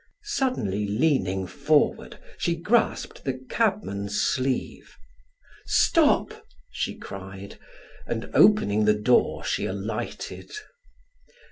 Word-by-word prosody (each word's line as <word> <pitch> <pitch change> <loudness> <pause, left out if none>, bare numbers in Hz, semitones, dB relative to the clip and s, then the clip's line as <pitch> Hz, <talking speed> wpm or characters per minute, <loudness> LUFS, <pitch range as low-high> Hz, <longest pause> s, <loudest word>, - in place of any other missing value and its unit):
Suddenly 120 - -1
leaning 100 -5 +1
forward - - +1 0.2
she 170 - 0
grasped 210 +8 0
the 130 -2 -2
cabman's 145 - -1
sleeve. 130 0 -2 0.7
"Stop!" - - +3 0.4
she - - -3
cried, 95 0 -9 0.5
and 115 -1 -3
opening 110 - +4
the 105 0 +4
door, 120 +4 +2
she - - -1
alighted. 105 +4 -5
110 Hz, 90 wpm, -25 LUFS, 100-165 Hz, 0.7 s, opening